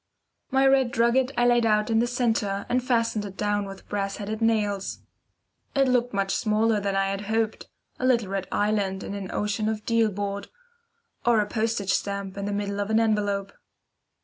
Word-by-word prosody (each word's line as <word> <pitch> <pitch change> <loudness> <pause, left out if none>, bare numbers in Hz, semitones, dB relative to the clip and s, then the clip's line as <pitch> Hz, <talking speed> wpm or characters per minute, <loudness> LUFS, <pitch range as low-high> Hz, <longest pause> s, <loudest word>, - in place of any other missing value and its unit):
My 270 0 +3
red 270 -2 +4
drugget 240 +3 +2
I 240 - +3
laid 240 -1 +4
out 215 0 +2
in 225 - +3
the 240 - +2
centre, 225 -5 0
and 250 0 +1
fastened 230 -4 +1
it 195 -2 -8
down 205 -1 0
with 195 0 -10
brass 195 -1 -2
headed 215 +2 -4
nails. 210 -3 0 0.7
It 275 -1 +4
looked 245 -1 +2
much 195 -1 0
smaller 215 0 +2
than 200 -1 -1
I 195 0 +1
had 195 0 -3
hoped, 220 0 -1 0.3
a 255 - -1
little 235 -6 +2
red 195 -1 -3
island 205 -2 0
on - - -5
an 200 -2 -5
ocean 210 +1 -1
of 215 -1 -4
deal 230 -1 +3
board, 200 0 -4 0.8
or 235 -2 +4
a 210 - +2
postage 215 -2 -1
stamp 200 -1 -2
in 200 0 -4
the 205 - -2
middle 200 0 -2
of 205 +1 -2
an 220 0 +3
envelope. 205 -3 0
210 Hz, 190 wpm, -26 LUFS, 200-230 Hz, 0.8 s, red